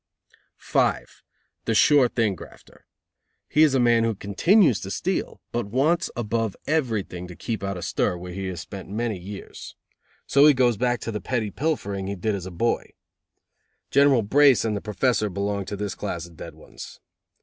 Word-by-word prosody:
5. - - -1 0.4
The 115 - 0
sure 140 +2 +5
thing 110 -4 +1
grafter. 90 - -14 0.6
He 150 - +2
is 150 -4 +5
a - - +3
man 120 -2 +4
who 115 -1 0
continues 125 - +3
to 95 - -7
steal, 185 - -3
but 120 -3 -2
wants 145 +10 +1
above 115 -2 -2
everything 110 - -1
to 90 - -10
keep 110 +1 -4
out 100 -1 -3
of 90 - -5
stir, 90 - 0
where 90 0 -8
he 95 +1 -4
has 90 -2 -5
spent 95 +2 -9
many 110 -1 -2
years. 95 +2 -9 0.5
So 140 +2 +5
he 150 - +6
goes 125 -2 +3
back 120 +2 0
to 115 - -4
the 105 -2 -4
petty 110 0 -2
pilfering 100 -11 -2
he 100 - -3
did 105 +4 -1
as 95 -2 -4
a - - -8
boy. 115 +8 -1 1.0
General 140 -4 +4
Brace 135 +3 +4
and 110 -2 0
the 100 - -3
Professor 110 +1 0
belonged 100 0 -3
to 105 - -4
this 100 0 -3
class 85 -1 -5
of 85 -1 -15
"dead - - -9
ones." - - -12
110 Hz, 180 wpm, -24 LUFS, 100-125 Hz, 1.0 s, he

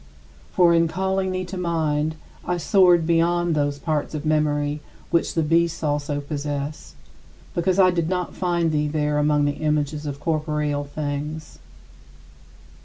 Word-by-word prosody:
For 175 -1 +5
in 165 0 +4
calling 190 +2 -1
thee 185 0 -2
to 185 +1 -7
mind, 160 -3 0 0.3
I 180 - -1
soared 175 -2 +4
beyond 170 +1 +2
those 145 -1 0
parts 155 0 -2
of 155 +1 -5
memory 150 -1 0 0.3
which 170 - +1
the 165 - +2
beasts 165 +1 +1
also 145 -1 -1
possess, 145 - -5 0.6
because 180 +2 +1
I 185 -2 +6
did 170 -2 -1
not 180 -1 -2
find 175 -3 0
thee 150 -1 +1
there 150 -1 0
among 150 0 +2
the 145 - +2
images 150 -1 -1
of 140 -1 -5
corporeal 150 -2 -1
things. 150 +1 -5
155 Hz, 145 wpm, -23 LUFS, 150-170 Hz, 0.6 s, I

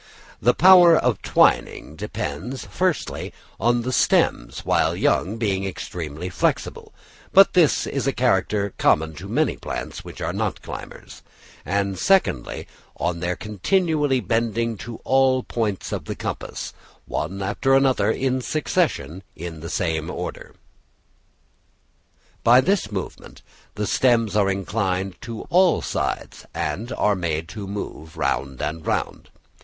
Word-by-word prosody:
The 120 +4 +4
power 175 -2 +8
of 120 -6 +1
twining 75 - +2
depends, 125 - -5
firstly, 180 -3 -2 0.3
on 120 0 +2
the 130 - -2
stems - - +1
while - - +2
young 100 +6 +1
being 100 -4 0
extremely 85 -3 -5
flexible 90 - -2 0.4
(but 195 +1 +7
this 170 -5 +4
is 140 -1 -2
a - - +3
character 105 -4 +1
common 80 +1 +3
to 95 +5 -8
many 145 +9 0
plants - - -6
which - - -10
are - - -2
not - - -2
climbers); - - -9 0.4
and, 100 +2 -1
secondly, 190 - +1 0.3
on 85 0 -1
their 90 +1 -1
continually 145 - +1
bending 115 0 0
to 115 +3 -8
all 130 -1 +3
points 105 -5 -2
of - - -4
the - - -4
compass, - - -5 0.3
one 95 +6 -3
after 135 +7 +2
the 135 - +3
other 110 -5 +2
in 130 +2 0
succession, 95 - -1
in 80 0 -7
the 80 +1 -7
same 80 -4 -1
order. - - -6 1.9
By 120 +2 +7
this 180 - +1
movement 95 -3 -7 0.3
the 105 - -2
stems 115 -3 +2
are 100 -2 +3
inclined 95 -1 -2
to 115 -2 -6
all 180 0 +4
sides, - - -3
and 100 +11 -3
are 105 -1 +2
made 80 -3 -2
to 105 -3 -7
move 80 -6 -7
round 65 -1 -1
and 80 +2 -3
round. - - -2
105 Hz, 135 wpm, -23 LUFS, 90-130 Hz, 1.9 s, power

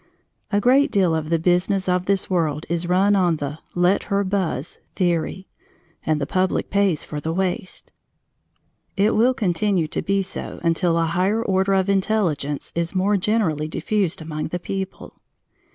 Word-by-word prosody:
A 205 - +3
great 265 +7 +4
deal 190 -5 +2
of 155 -1 -2
the 165 - +3
business 180 +3 +1
of 180 0 0
this 195 -1 +1
world 160 -4 0
is 170 +1 -2
run 195 +3 +4
on 180 -4 +3
the 145 0 -5 0.2
"let 180 +2 +2
her 200 0 0
buzz" 185 -6 -2 0.2
theory, 180 +1 -1 0.6
and 155 -1 0
the 140 - -1
public 185 +4 0
pays 200 -6 +2
for 150 - -5
the 160 +2 -3
waste. 185 +1 -3 1.1
It 205 +3 +3
will 245 +4 +3
continue 190 -4 +1
to - - -2
be 195 0 0
so 190 - -6
until 170 0 +2
a 165 - +2
higher 185 +7 +1
order 190 -1 +1
of 190 0 +1
intelligence 190 -8 0
is 170 +2 -2
more 195 +3 +2
generally 185 -7 0
diffused 185 0 -1
among 155 -1 -4
the 175 - -3
people. 190 +1 -6
185 Hz, 165 wpm, -22 LUFS, 165-200 Hz, 1.1 s, great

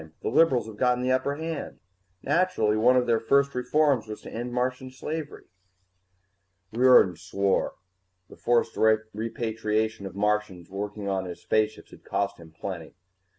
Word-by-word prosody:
The - - 0
liberals 130 -3 +3
have 110 -2 -10
gotten 125 +1 +2
the 130 - +1
upper 135 +2 +1
hand. 160 0 -5 0.4
Naturally, 170 -13 +2
one 125 +4 +4
of 125 - +2
their 115 -2 +2
first 140 +4 +2
reforms 125 -1 +1
was 105 0 -7
to - - -9
end 120 +2 -4
Martian 125 +1 -2
slavery." 150 +4 -6 1.3
Riordan 120 -7 +5
swore. 95 +2 0 0.5
The - - -14
forced 120 -1 +1 0.4
repatriation 110 -1 -2
of 95 - -11
Martians 105 -3 -1
working 100 +1 -5
on 95 -1 -1
his 90 -1 -8
spaceships 110 0 0
had - - -15
cost 100 -1 -2
him 80 -1 -13
plenty. 85 0 -7
110 Hz, 150 wpm, -26 LUFS, 100-130 Hz, 1.3 s, Riordan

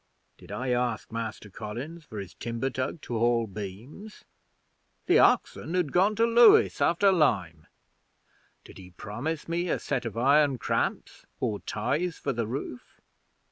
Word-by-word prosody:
Did - - -13
I 130 +1 -3
ask 120 -3 -1
Master 110 -2 -5
Collins 125 - -7
for 110 - -10
his 95 -2 -8
timber 115 +3 -3
tug 130 +5 -3
to 115 -2 -4
haul 120 0 +2
beams? 110 - -9 0.8
The - - +4
oxen 170 - +2
had 175 -6 0
gone 195 +4 +3
to 225 +2 +3
Lewes 235 0 +6
after 195 +4 +4
lime. 90 - +1 1.0
Did - - -14
he 90 -1 -12
promise 125 - -5
me 170 +1 -1
a - - +1
set 135 -3 -3
of 115 -1 -5
iron 140 +2 +4
cramps - - -2
or 105 -2 -1
ties 160 +11 -2
for 140 - -2
the 115 -2 -2
roof? 125 0 -7
125 Hz, 150 wpm, -27 LUFS, 110-165 Hz, 1.0 s, Lewes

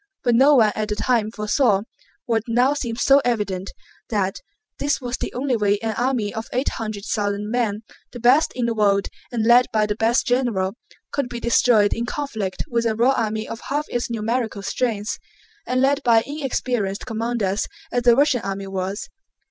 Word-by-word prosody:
But 240 -2 +3
no 275 +5 +6
one 220 -5 +5
at 215 0 -2
the 210 - -1
time 220 0 +1
foresaw 210 -1 +1 0.4
(what 225 -2 +1
now 245 +4 +3
seems 240 -5 -3
so 275 +1 +6
evident) 200 -5 -1 0.4
that 195 -4 -1 0.4
this 285 -1 0
was 245 -2 -3
the - - -4
only 260 0 0
way 205 -2 +2
an 220 -1 -1
army 240 -4 0
of 220 +1 -5
eight 255 +3 0
hundred 215 -2 -5
thousand 205 0 -2
men—the 230 0 -4
best 255 +7 +4
in 245 -1 -1
the 235 - 0
world 200 -2 +2 0.2
and 230 -3 -1
led 240 +2 +6
by 215 -1 +2
the 210 - -1
best 225 +3 +1
general—could 245 +2 -2
be 240 - -5
destroyed 235 -3 +3
in 235 +1 -3
conflict 225 -10 -3
with 235 -1 0
a 220 - 0
raw 240 +4 +4
army 220 -3 -1
of 225 - -7
half 295 +2 0
its 240 0 -2
numerical 225 -2 -2
strength, 215 -1 -2 0.5
and 255 0 +1
led 280 +2 +2
by 230 -3 +4
inexperienced 250 -8 -2
commanders 225 -3 -1 0.2
as 245 - +1
the 240 -1 +5
Russian 275 -3 +3
army 195 -1 -4
was. 195 +1 -4
230 Hz, 180 wpm, -22 LUFS, 210-250 Hz, 0.5 s, no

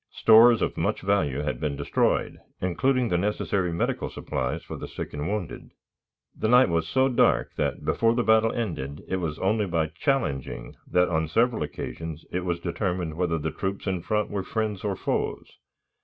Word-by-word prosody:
Stores 115 +1 +6
of - - -2
much - - 0
value 80 -9 +1
had 75 0 -3
been 75 -2 -2
destroyed, - - 0 0.2
including 125 +8 +1
the 90 - +1
necessary 100 -2 0
medical 85 - -1
supplies 70 +5 -3
for - - -7
the - - -6
sick - - -7
and 75 +2 -3
wounded. 100 -4 -4 0.7
The - - -1
night 125 0 +6
was 85 -1 0
so 130 +8 +3
dark 125 - +2
that, - - -2
before 115 0 +2
the 120 - +1
battle 110 0 +4
ended, 75 - -4
it 95 - -1
was 80 -4 -3
only 105 +2 +1
by 80 -3 0
challenging 80 - -2
that 90 0 +3
on 80 -2 0
several 115 +7 +1
occasions 75 +2 -5
it 90 0 -2
was 85 -1 -1
determined 90 -2 -2
whether 85 0 0
the 80 0 -3
troops 95 +5 -4
in 95 -3 -1
front 105 +4 -1
were 100 -1 -1
friends 105 -1 -3
or 100 -2 -1
foes. - - -3
90 Hz, 180 wpm, -26 LUFS, 80-110 Hz, 0.7 s, Stores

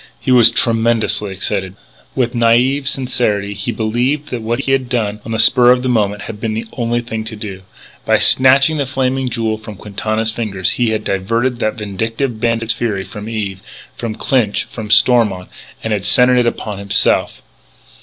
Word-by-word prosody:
He - - -2
was 120 -2 +7
tremendously 115 -3 +1
excited. 95 0 -3 0.4
With 125 -2 0
naïve 125 +4 +2
sincerity 110 -7 -1
he 100 +3 -4
believed 120 +7 -1
that 120 - -3
what 120 +3 -2
he 135 - -2
had 135 -2 0
done 105 -4 -2
on 115 - -7
the 110 - -1
spur 120 +2 +5
of 125 0 +4
the 130 - -1
moment 105 -3 0
had 105 0 -8
been 110 -2 -2
the 115 +1 -4
only 120 -1 -1
thing 115 -2 -5
to 110 0 -6
do. 100 -3 -7 0.4
By - - +3
snatching 135 +4 +4
the 140 -2 -1
Flaming 130 -1 -1
Jewel 110 -2 -2
from 105 -1 -9
Quintana's 110 +2 -2
very 115 0 -3
fingers 95 -2 -1
he 120 -2 0
had 110 -1 -2
diverted 115 +6 -1
that 110 - -1
vindictive 110 +3 -3
bandit's 115 -1 +1
fury 110 -5 -2
from 105 +4 -8
Eve, 100 -4 -4 0.3
from 115 -2 -5
Clinch, 120 -6 0
from 110 -2 -8
Stormont, 110 -4 +3 0.3
and 110 - -1
had 100 -2 -2
centred 125 +3 +5
it 120 - +2
upon 105 -3 -4
himself. 100 0 0
115 Hz, 185 wpm, -16 LUFS, 105-125 Hz, 0.4 s, was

